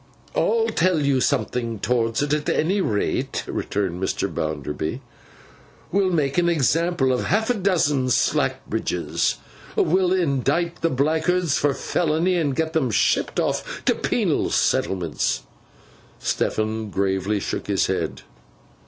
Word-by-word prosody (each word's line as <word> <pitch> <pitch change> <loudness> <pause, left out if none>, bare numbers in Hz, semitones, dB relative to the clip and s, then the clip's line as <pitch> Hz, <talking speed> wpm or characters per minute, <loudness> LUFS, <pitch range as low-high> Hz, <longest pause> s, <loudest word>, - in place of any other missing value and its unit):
'I'll 455 -1 +2
tell 180 -1 +2
you 140 -2 +2
something 115 -3 0
towards 115 +2 0
it, 145 0 0
at 150 -1 0
any 190 +6 +1
rate,' 105 - -1
returned 95 -3 -2
Mr. 95 - -1
Bounderby. 75 0 -3 0.9
'We 200 +2 +3
will - - +2
make 150 -2 +1
an 175 0 +2
example 165 -2 +2
of 125 - -1
half 220 +5 +1
a - - +3
dozen 170 - +1
Slackbridges. 125 - 0 0.4
We'll 180 +1 +2
indict 170 -1 0
the 165 - +2
blackguards 160 +4 +1
for 140 -2 +1
felony, 170 +2 0
and 150 -6 0
get 160 +2 -1
'em 140 -6 +2
shipped 110 - +1
off - - -2
to - - +4
penal - - 0
settlements.' 85 -9 0 0.7
Stephen 110 0 -1
gravely 95 +1 0
shook - - -4
his - - +2
head. - - -2
145 Hz, 130 wpm, -23 LUFS, 110-170 Hz, 0.9 s, to